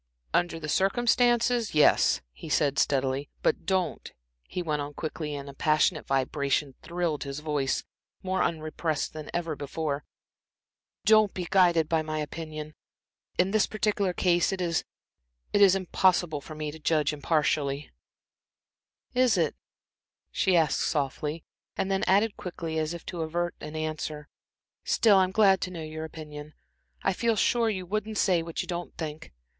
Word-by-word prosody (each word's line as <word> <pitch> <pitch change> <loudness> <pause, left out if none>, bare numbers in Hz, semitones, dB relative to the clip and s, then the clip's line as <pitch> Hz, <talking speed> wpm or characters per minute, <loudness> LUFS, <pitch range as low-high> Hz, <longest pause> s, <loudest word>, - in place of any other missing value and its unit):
"Under 175 -1 +1
the 155 - -6
circumstances 240 +3 +2
yes," 150 - +5
he 60 - -10
said, 140 -2 +2
steadily. 135 0 +1
"But - - +1
don't," 190 -2 -1 0.4
he 180 - -4
went 150 -3 -1
on 145 0 -6
quickly, 155 -2 -4
and 140 -1 -7
passionate 155 -1 +2
vibration 140 +1 0
thrilled 170 -2 -2
his 140 -1 -5
voice, 145 -4 -1 0.4
more 190 0 0
unrepressed 155 -2 -1
than 155 -1 -7
ever 165 -3 -2
before, 145 0 -3 1.0
"don't 215 -2 +5
be 180 -2 -3
guided 175 -4 +4
by 160 0 +2
my 155 0 -4
opinion. 155 0 -5 0.6
In 185 +2 +2
this 215 0 +3
particular 210 -3 0
case 175 0 +2
it 190 - -3
is 170 -2 0 0.7
impossible 185 -5 +3
for 155 - -9
me 150 -1 -4
to 160 - -11
judge 155 -1 +1
impartially." 145 -1 0 1.2
"Is 250 -4 +3
it," 165 -4 +1 0.8
she 185 -2 +2
asked 160 -4 +2
softly, 150 +2 -1 0.3
and 195 - -1
then 195 - +1
added 200 +3 +3
quickly, 165 -3 -4
as 155 +2 -2
if 170 - -10
to 175 - -5
avert 175 +2 -1
an 150 +1 -7
answer, 155 -1 -4 0.5
"still, 210 -4 +4
I'm 185 -1 +4
glad 195 -2 +4
to - - -2
know 170 -3 -6
your 155 0 -5
opinion. 150 -1 -9 0.5
I 195 - +2
feel 230 +4 +1
sure 230 +2 +2
you 190 -4 -3
wouldn't 215 +3 -3
say 180 -4 +3
what 165 0 -4
you - - -10
don't 175 0 -5
think. 155 -1 -6
165 Hz, 150 wpm, -28 LUFS, 150-190 Hz, 1.2 s, yes